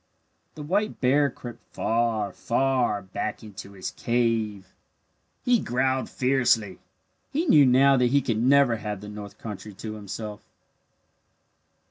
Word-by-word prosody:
The 150 Hz, -, -7 dB
white 200 Hz, +8 st, -1 dB
bear 140 Hz, +2 st, +3 dB
crept 120 Hz, -2 st, -10 dB
far, 115 Hz, -4 st, 0 dB
far 120 Hz, -4 st, 0 dB
back 95 Hz, +4 st, -5 dB
into 100 Hz, -2 st, -10 dB
his 95 Hz, -2 st, -5 dB
cave. 110 Hz, -5 st, -1 dB, 0.7 s
He 245 Hz, -2 st, +4 dB
growled 130 Hz, -1 st, 0 dB
fiercely. 125 Hz, -6 st, +1 dB, 0.5 s
He 310 Hz, +5 st, 0 dB
knew 150 Hz, -, +6 dB
now 135 Hz, +2 st, +5 dB
that 125 Hz, -1 st, +3 dB
he 140 Hz, +4 st, +3 dB
could 115 Hz, -5 st, -1 dB
never 130 Hz, -2 st, +4 dB
have 105 Hz, -2 st, -5 dB
the 105 Hz, -, -8 dB
north 105 Hz, -1 st, -9 dB
country 105 Hz, -1 st, -8 dB
to 110 Hz, +2 st, -6 dB
himself. 105 Hz, 0 st, -7 dB
120 Hz, 130 wpm, -25 LUFS, 105-135 Hz, 0.7 s, knew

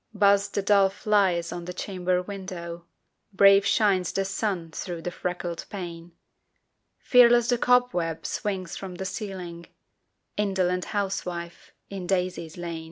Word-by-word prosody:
Buzz 200 Hz, 0 st, +4 dB
the 200 Hz, -, -2 dB
dull 200 Hz, -1 st, +5 dB
flies 190 Hz, -4 st, +1 dB
on 175 Hz, -1 st, -6 dB
the 180 Hz, -, -5 dB
chamber 180 Hz, -1 st, -1 dB
window; 175 Hz, -3 st, -7 dB, 0.4 s
Brave 195 Hz, 0 st, +6 dB
shines 195 Hz, -5 st, +2 dB
the 195 Hz, -, -1 dB
sun 195 Hz, -4 st, -2 dB
through 170 Hz, 0 st, -5 dB
the 175 Hz, -, -3 dB
freckled 175 Hz, -1 st, -4 dB
pane; 170 Hz, -3 st, -7 dB, 0.8 s
Fearless 240 Hz, -1 st, +5 dB
the 245 Hz, -1 st, +2 dB
cobweb 245 Hz, -11 st, +2 dB
swings 190 Hz, -5 st, -3 dB
from 190 Hz, -2 st, -7 dB
the 190 Hz, -, -5 dB
ceiling 185 Hz, -4 st, -6 dB, 0.7 s
Indolent 185 Hz, -3 st, 0 dB
housewife, 180 Hz, -4 st, -4 dB, 0.2 s
in 190 Hz, -3 st, -5 dB
daisies 180 Hz, -3 st, -2 dB
lain! 170 Hz, -2 st, -4 dB
185 Hz, 130 wpm, -26 LUFS, 175-200 Hz, 0.8 s, Brave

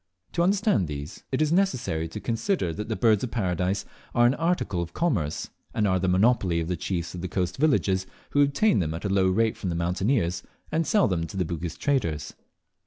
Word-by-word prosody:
To 170 Hz, -, 0 dB
understand 195 Hz, -, +2 dB
these, 70 Hz, 0 st, -7 dB
it 135 Hz, +3 st, +2 dB
is 155 Hz, -, 0 dB
necessary 130 Hz, -, +1 dB
to 105 Hz, -, -7 dB
consider 115 Hz, -, -1 dB
that 105 Hz, +7 st, -5 dB
the 110 Hz, -, 0 dB
Birds 110 Hz, -3 st, +3 dB
of 125 Hz, -, -2 dB
Paradise 95 Hz, -3 st, -1 dB, 0.3 s
are 120 Hz, -, +5 dB
an 120 Hz, -, +5 dB
article 165 Hz, -, 0 dB
of 85 Hz, 0 st, -6 dB
commerce, 105 Hz, -, -1 dB, 0.2 s
and 105 Hz, -2 st, +2 dB
are 95 Hz, -1 st, +2 dB
the 95 Hz, -, 0 dB
monopoly 95 Hz, -2 st, +3 dB
of 80 Hz, -, -2 dB
the 90 Hz, -, -1 dB
chiefs 85 Hz, 0 st, -3 dB
of 90 Hz, -, -6 dB
the 95 Hz, -, -3 dB
coast 90 Hz, +2 st, -2 dB
villages, 100 Hz, -11 st, +2 dB, 0.2 s
who 145 Hz, -, +3 dB
obtain 145 Hz, +10 st, +3 dB
them 80 Hz, -3 st, -1 dB
at 85 Hz, -, -6 dB
a -, -, 0 dB
low 95 Hz, -1 st, +3 dB
rate 110 Hz, +4 st, +2 dB
from 95 Hz, -, -3 dB
the 85 Hz, -, -2 dB
mountaineers, 90 Hz, +2 st, 0 dB, 0.3 s
and 160 Hz, -1 st, 0 dB
sell 210 Hz, +2 st, +4 dB
them 85 Hz, -4 st, -1 dB
to 95 Hz, -, -8 dB
the 90 Hz, -, +1 dB
Bugis 85 Hz, 0 st, -4 dB
traders. 95 Hz, -, -1 dB
95 Hz, 215 wpm, -26 LUFS, 85-135 Hz, 0.3 s, are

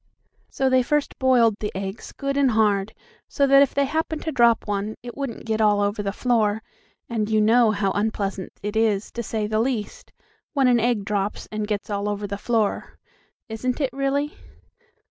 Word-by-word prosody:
So 270 Hz, -, 0 dB
they 260 Hz, 0 st, +4 dB
first 295 Hz, +3 st, -1 dB
boiled 240 Hz, -5 st, +4 dB
the 210 Hz, -, -3 dB
eggs 195 Hz, +2 st, -5 dB
good 275 Hz, -1 st, -3 dB
and 280 Hz, -2 st, +3 dB
hard, 215 Hz, -2 st, +1 dB, 0.3 s
so 280 Hz, -, +1 dB
that 275 Hz, 0 st, +6 dB
if 280 Hz, -, +2 dB
they 280 Hz, 0 st, +3 dB
happened 315 Hz, +2 st, -2 dB
to 320 Hz, -, -2 dB
drop 235 Hz, -5 st, +3 dB
one, 205 Hz, +1 st, -2 dB
it 240 Hz, -1 st, -8 dB
wouldn't 275 Hz, -5 st, -5 dB
get 220 Hz, -1 st, -1 dB
all 210 Hz, -1 st, +4 dB
over 205 Hz, +1 st, 0 dB
the 200 Hz, -1 st, -2 dB
floor, 220 Hz, -2 st, +1 dB, 0.4 s
and 220 Hz, -3 st, -2 dB
you 215 Hz, 0 st, +3 dB
know 225 Hz, +2 st, +5 dB
how 200 Hz, -2 st, 0 dB
unpleasant 200 Hz, -2 st, -2 dB
it 210 Hz, +1 st, -3 dB
is, 215 Hz, -2 st, +1 dB
to 235 Hz, -, -4 dB
say 220 Hz, -1 st, -2 dB
the 215 Hz, +1 st, 0 dB
least, 230 Hz, -3 st, -3 dB, 0.4 s
when 275 Hz, -3 st, +3 dB
an 245 Hz, -1 st, +4 dB
egg 230 Hz, -3 st, 0 dB
drops, 205 Hz, -1 st, -2 dB
and 215 Hz, -1 st, -3 dB
gets 210 Hz, 0 st, -3 dB
all 200 Hz, 0 st, -1 dB
over 205 Hz, 0 st, -3 dB
the 200 Hz, 0 st, -5 dB
floor. 220 Hz, -2 st, -1 dB, 0.5 s
Isn't 245 Hz, +4 st, -3 dB
it, 275 Hz, -3 st, -1 dB
really? 275 Hz, +2 st, -1 dB
220 Hz, 190 wpm, -23 LUFS, 205-255 Hz, 0.5 s, that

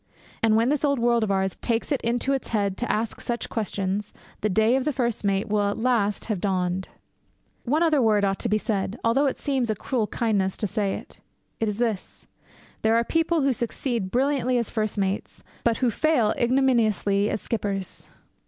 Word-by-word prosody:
And 220 Hz, -1 st, +4 dB
when 230 Hz, +3 st, +3 dB
this 295 Hz, 0 st, 0 dB
old 280 Hz, -1 st, +2 dB
world 235 Hz, -1 st, +2 dB
of 215 Hz, -, -1 dB
ours 190 Hz, -1 st, 0 dB
takes 230 Hz, +4 st, -1 dB
it 280 Hz, -, +1 dB
into 245 Hz, +4 st, 0 dB
its 270 Hz, -, -2 dB
head 200 Hz, -3 st, 0 dB
to 245 Hz, -, -1 dB
ask 220 Hz, +1 st, -2 dB
such 240 Hz, 0 st, -3 dB
questions, 205 Hz, -2 st, -2 dB, 0.3 s
the 215 Hz, -, 0 dB
day 220 Hz, +5 st, +3 dB
of 265 Hz, -, +1 dB
the 300 Hz, -, 0 dB
first 240 Hz, -5 st, -1 dB
mate 200 Hz, +1 st, +1 dB
will 205 Hz, -1 st, +1 dB
at 205 Hz, -, -3 dB
last 225 Hz, -4 st, +1 dB
have 210 Hz, -6 st, -2 dB
dawned. 185 Hz, -1 st, -1 dB, 0.8 s
One 300 Hz, +7 st, +2 dB
other 310 Hz, -4 st, +3 dB
word 210 Hz, -3 st, +3 dB
ought 195 Hz, 0 st, 0 dB
to -, -, -2 dB
be 215 Hz, -, +3 dB
said, 205 Hz, 0 st, -2 dB
although 270 Hz, +5 st, +3 dB
it 270 Hz, -, -1 dB
seems 265 Hz, -5 st, -1 dB
a 215 Hz, -, +1 dB
cruel 225 Hz, +1 st, -1 dB
kindness 200 Hz, -5 st, 0 dB
to -, -, -1 dB
say 200 Hz, -1 st, -1 dB
it. -, -, -10 dB, 0.4 s
It 225 Hz, -, 0 dB
is 210 Hz, -1 st, -2 dB
this. 225 Hz, -5 st, -2 dB, 0.6 s
There 220 Hz, +1 st, +3 dB
are 230 Hz, -, +3 dB
people 325 Hz, +4 st, +1 dB
who 270 Hz, -1 st, +3 dB
succeed 235 Hz, -3 st, -2 dB
brilliantly 255 Hz, +1 st, +1 dB
as 235 Hz, -3 st, -1 dB
first 215 Hz, -2 st, -1 dB
mates, 195 Hz, 0 st, -2 dB, 0.2 s
but 235 Hz, -1 st, +2 dB
who 250 Hz, -3 st, +1 dB
fail 245 Hz, -5 st, +2 dB
ignominiously 230 Hz, -5 st, +2 dB
as -, -, -1 dB
skippers. 200 Hz, -4 st, -3 dB
225 Hz, 200 wpm, -25 LUFS, 205-250 Hz, 0.8 s, And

